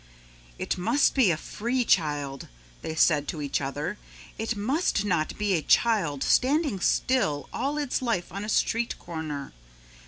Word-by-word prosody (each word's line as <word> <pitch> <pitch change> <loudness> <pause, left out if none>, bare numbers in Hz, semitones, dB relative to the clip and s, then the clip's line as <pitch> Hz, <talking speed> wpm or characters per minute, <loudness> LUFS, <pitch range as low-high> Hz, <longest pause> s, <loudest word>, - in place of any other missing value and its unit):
"It - - -2
must 235 +10 +3
be 255 -8 +4
a 165 - +2
free 240 +9 -2
child," 145 - 0 0.3
they 160 - -5
said 150 -3 +3
to 160 - -4
each 145 -1 -1
other. 145 +8 -4 0.4
"It 225 +1 -1
must 220 - 0
not 170 -6 0
be 210 -2 0
a 165 - +1
child 165 - +2
standing 280 - +2
still 165 - +1
all 285 +2 -1
its 285 -4 -1
life 230 -8 -1
on 200 +3 -5
a 210 - -5
street 230 +2 0
corner. 155 -4 -6
195 Hz, 155 wpm, -27 LUFS, 155-235 Hz, 0.4 s, be